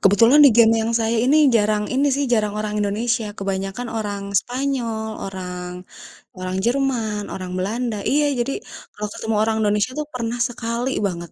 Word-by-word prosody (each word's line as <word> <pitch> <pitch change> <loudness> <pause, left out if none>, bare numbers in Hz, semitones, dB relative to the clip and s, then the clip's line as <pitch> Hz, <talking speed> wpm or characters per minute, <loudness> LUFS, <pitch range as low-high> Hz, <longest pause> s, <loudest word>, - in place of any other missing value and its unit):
Kebetulan 230 +9 +6
di - - +10
game 225 -1 +7
yang 225 +1 -1
saya 225 +1 +1
ini 275 +4 +4 0.2
jarang 210 -1 +1
ini 275 +3 +2
sih, 285 - 0
jarang 210 -3 +2
orang 215 0 -3
Indonesia, 225 +4 0
kebanyakan 195 +4 -3
orang 205 -2 -3 0.2
Spanyol, 245 -4 -3 0.2
orang 180 -2 -6 0.7
orang 185 0 -4
Jerman, 240 -5 0
orang 185 -1 -6
Belanda 220 +4 -2
iya, 295 +2 +3 0.2
jadi 240 +3 0 0.4
kalau 210 0 -4
ketemu 220 0 -3
orang 220 0 +1
Indonesia 210 +3 +1
tuh, 300 - -3
pernah 240 -1 -3
sekali 235 +1 -3 0.2
banget 170 -3 -6
220 Hz, 160 wpm, -21 LUFS, 205-245 Hz, 0.7 s, di